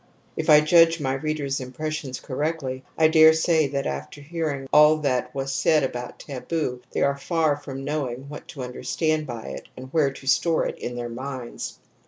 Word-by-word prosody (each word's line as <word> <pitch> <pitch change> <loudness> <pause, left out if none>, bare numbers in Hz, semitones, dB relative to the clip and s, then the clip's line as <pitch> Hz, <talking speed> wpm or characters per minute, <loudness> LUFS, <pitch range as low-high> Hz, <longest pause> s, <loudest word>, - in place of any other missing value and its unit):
If 160 0 -3
I 150 0 +9
judge 165 +1 +5
my 135 -2 -1
readers' 140 -1 -2
impressions 130 0 -4
correctly, 135 -2 -3
I 160 - +6
dare 160 0 +7
say 160 -1 +2
that 140 0 -2
after 70 - -5
hearing 145 -3 -3
all 150 +1 +7
that 130 -4 -1
was 135 0 -2
said 155 +2 +3
about 125 -2 -4
taboo 135 -2 -4
they - - 0
are 140 0 +2
far 155 +1 +1
from 135 -2 -7
knowing 135 -3 -3
what 150 +1 -9
to 135 - -7
understand 155 +5 -1
by 115 -11 -6
it 65 - -8
and 130 +1 -10
where 155 -4 +3
to 135 - -12
store 160 +4 +2
it - - -4
in 120 - -5
their 120 0 -4
minds. 130 0 -6
140 Hz, 185 wpm, -24 LUFS, 130-155 Hz, -, I